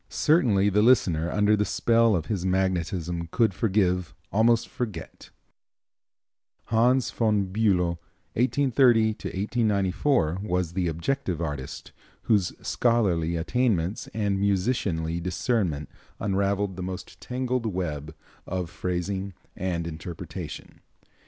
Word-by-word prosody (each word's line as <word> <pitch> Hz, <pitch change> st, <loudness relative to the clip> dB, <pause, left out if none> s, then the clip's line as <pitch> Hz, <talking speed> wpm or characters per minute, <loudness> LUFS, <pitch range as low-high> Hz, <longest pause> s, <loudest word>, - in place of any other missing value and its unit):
Certainly 115 Hz, -, +3 dB
the 105 Hz, +1 st, +3 dB
listener 90 Hz, -9 st, +3 dB
under 105 Hz, 0 st, +3 dB
the 105 Hz, -, +1 dB
spell 115 Hz, 0 st, +3 dB
of 80 Hz, -4 st, -1 dB
his 95 Hz, -2 st, -2 dB
magnetism 90 Hz, -2 st, -1 dB
could 110 Hz, +3 st, +2 dB
forgive, 90 Hz, -6 st, 0 dB, 0.2 s
almost 115 Hz, +2 st, +3 dB
forget. 105 Hz, -10 st, -6 dB, 1.4 s
Hans 120 Hz, +3 st, +3 dB
von 105 Hz, -5 st, 0 dB
Bülow 90 Hz, -6 st, +2 dB, 0.3 s
(1830 125 Hz, -3 st, +3 dB
1894) 100 Hz, -, 0 dB
was 90 Hz, -5 st, -1 dB
the 90 Hz, -1 st, 0 dB
objective 85 Hz, -, -2 dB
artist, 75 Hz, -5 st, -5 dB, 0.3 s
whose 100 Hz, -5 st, +2 dB, 0.2 s
scholarly 95 Hz, -9 st, +1 dB
attainments 95 Hz, 0 st, 0 dB
and 100 Hz, -3 st, -1 dB
musicianly 95 Hz, -5 st, 0 dB
discernment 90 Hz, -, -1 dB, 0.3 s
unraveled 100 Hz, -1 st, 0 dB
the -, -, -4 dB
most 95 Hz, +1 st, -7 dB
tangled 125 Hz, -1 st, -2 dB
web 80 Hz, -6 st, -4 dB, 0.3 s
of 90 Hz, -2 st, -3 dB
phrasing 95 Hz, +2 st, -3 dB, 0.2 s
and 85 Hz, -2 st, -2 dB
interpretation. 85 Hz, +1 st, -7 dB
95 Hz, 105 wpm, -26 LUFS, 85-110 Hz, 1.4 s, Certainly